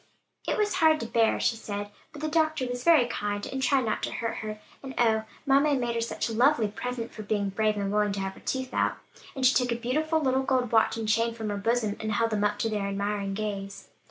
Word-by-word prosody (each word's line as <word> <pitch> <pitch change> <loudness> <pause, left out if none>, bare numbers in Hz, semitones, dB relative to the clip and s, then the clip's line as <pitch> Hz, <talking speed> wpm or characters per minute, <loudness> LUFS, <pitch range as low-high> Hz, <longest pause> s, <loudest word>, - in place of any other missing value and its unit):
"It - - 0
was 420 -2 +1
hard 315 -1 +5
to - - -3
bear," 225 0 +2
she 230 - +1
said, 205 -2 -5 0.2
"but 300 0 -10
the - - +1
doctor 315 -3 +1
was 245 0 -4
very 320 -7 +6
kind, 205 -3 -3
and 265 - -4
tried 265 -2 +2
not 215 - -1
to - - -2
hurt 230 -1 -3
her. 215 -1 -5 0.2
And, 270 -1 -8
oh, 220 -2 +3 0.2
mamma 280 +2 +4
had 280 -2 +2
made 240 -1 -1
her 230 - -1
such 230 - -2
a 230 - -4
lovely 240 -1 +3
present, 235 +2 -5
for 215 - -7
being 205 -1 -1
brave 215 +1 0
and 200 -1 -1
willing 210 -1 +2
to 200 - -3
have 195 0 -3
her - - -15
tooth 260 -1 -3
out." - - +1 0.4
And 265 -1 0
she 255 - +6
took 250 -1 +2
a 235 - -1
beautiful 310 +7 0
little 265 -3 +1
gold 255 -3 0
watch 225 0 +3
and 225 -1 -3
chain 230 +2 +1
from 220 -2 -4
her 205 - -2
bosom, 220 0 0
and 215 0 -2
held 230 +2 +1
them 210 -1 0
up 205 0 +1
to 225 - -1
their 205 -2 -1
admiring 200 0 -2
gaze. 195 -2 -5
230 Hz, 255 wpm, -27 LUFS, 210-260 Hz, 0.4 s, very